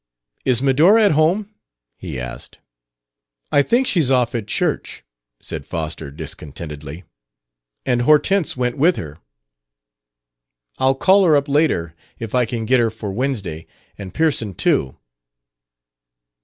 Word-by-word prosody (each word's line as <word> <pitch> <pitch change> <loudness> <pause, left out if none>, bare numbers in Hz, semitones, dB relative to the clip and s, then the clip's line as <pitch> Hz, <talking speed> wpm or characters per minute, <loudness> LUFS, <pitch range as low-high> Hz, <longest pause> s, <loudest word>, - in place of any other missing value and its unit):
"Is 130 -1 +2
Medora 165 - +5
at 205 - +4
home?" 180 +8 +1 0.4
he 65 - -7
asked. 60 0 -8 0.9
"I 145 - +5
think 240 - +2
she's 165 - +2
off 125 -3 +2
at 115 -4 -3
church," - - -2 0.4
said - - -6
Foster 80 -2 -5
discontentedly. 75 +1 -8 0.8
"And 125 -2 +1
Hortense 155 +5 +2
went 125 -1 -1
with 170 +5 +4
her." 75 -1 -8 1.6
"I'll 135 +1 +3
call 195 +7 +4
her 160 -3 +5
up 140 0 +1
later. 140 - +1 0.2
If 115 -2 -7
I 125 -1 +3
can 115 -1 -3
get 130 +3 +3
her 115 -1 +2
for 110 -2 -6
Wednesday 100 - -3 0.3
and 95 -2 -8
Pearson 140 - 0
too...." 65 -4 0
125 Hz, 130 wpm, -20 LUFS, -, 1.6 s, Medora